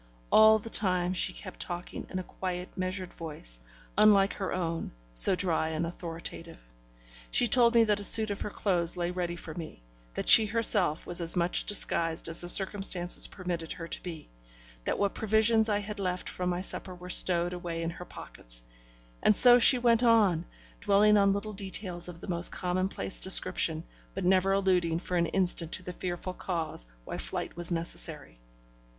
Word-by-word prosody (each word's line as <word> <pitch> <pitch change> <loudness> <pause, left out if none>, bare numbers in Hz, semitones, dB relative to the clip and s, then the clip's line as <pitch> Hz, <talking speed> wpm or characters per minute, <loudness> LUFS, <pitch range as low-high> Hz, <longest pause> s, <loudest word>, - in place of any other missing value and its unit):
All 220 0 +5
the 220 +1 -10
time 180 -3 0
she 185 - -1
kept 185 -3 -11
talking 175 0 -6
in 185 - -6
a 185 - -5
quiet, 180 0 -7
measured 185 0 -5
voice, 105 - -4 0.4
unlike 205 -1 +3
her 190 -2 -6
own, 165 - -5 0.2
so - - +7
dry 170 -4 -2
and 160 +1 -4
authoritative; 165 - -8 0.7
she - - +2
told 240 0 +4
me 230 - +5
that 210 -2 -1
a - - -6
suit 220 +1 +7
of 200 - -7
her - - -5
clothes 180 -4 -1
lay 175 0 -3
ready 175 -1 -5
for 165 -2 -10
me, 155 - -11 0.3
that - - -5
she 220 - +9
herself 205 -8 +1
was 175 0 -5
as 170 +1 -1
much 175 0 0
disguised 165 -6 0
as 165 0 +4
the 175 - +1
circumstances 190 -2 +3
permitted 175 -3 -6
her 165 - -9
to - - -4
be, 165 -4 -10 0.6
that - - -2
what 200 -1 -2
provisions 220 +1 +1
I 205 - 0
had 205 0 -7
left 180 -2 -4
from 180 0 -4
my 175 0 -3
supper 185 -1 -4
were 180 0 -13
stowed 175 -1 +5
away 170 -2 -6
in 165 - -4
her 180 +1 -11
pockets, - - -10 0.6
and 210 - +2
so 245 +2 +6
she 250 +2 +8
went 235 -1 +1
on, 210 -8 +1 0.3
dwelling 210 +1 +2
on 200 -1 +2
little 205 +2 -5
details 190 -3 -3
of 170 -1 -12
the - - -11
most 175 -1 +1
commonplace 180 - -2
description, - - +4 0.3
but - - -5
never 190 +1 +1
alluding 185 -4 0
for 180 +1 -6
an 170 -1 0
instant 175 -3 -1
to 185 - +1
the 180 - -8
fearful 180 +1 -6
cause 160 - -3 0.2
why - - -7
flight - - -6
was 175 -1 -3
necessary. 165 - -6
180 Hz, 180 wpm, -27 LUFS, 170-200 Hz, 0.7 s, she